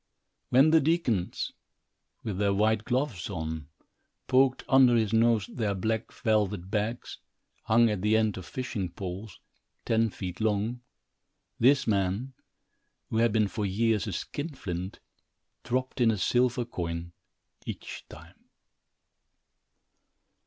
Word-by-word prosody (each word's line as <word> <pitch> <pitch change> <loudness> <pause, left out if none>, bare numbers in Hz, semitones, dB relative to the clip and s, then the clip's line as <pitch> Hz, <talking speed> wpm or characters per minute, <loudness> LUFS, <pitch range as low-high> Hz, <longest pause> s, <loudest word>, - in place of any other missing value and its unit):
When 135 +5 +5
the 160 -1 +6
deacons, 135 - 0 0.7
with 100 -4 -3
their 100 -1 +2
white 110 +1 +2
gloves 125 -8 -1
on, 80 -4 -4 0.6
poked 130 0 +3
under 130 -2 +6
his 110 -2 +1
nose 115 -2 +3
their 105 -5 -2
black 110 +4 -2
velvet 105 -6 0
bags, 110 +3 -2 0.5
hung 115 +1 +5
at 105 -4 -1
the 105 +2 +3
end 110 -2 +1
of 95 - -8
fishing 110 -8 -3
poles, 95 +1 -7 0.5
ten 115 0 +2
feet 95 -1 -6
long, 110 +3 0 0.8
this 135 +3 +4
man, 100 +5 0 0.8
who 110 - 0
had 115 0 +4
been 105 -1 +2
for 105 +1 -4
years 110 +2 +1
a - - -2
skinflint, 95 - -5 0.6
dropped 130 +2 -2
in 120 - +5
a 110 - +1
silver 120 +4 +1
coin 85 -5 -5 0.5
each - - -6
time. - - -14
110 Hz, 125 wpm, -28 LUFS, 100-120 Hz, 0.8 s, the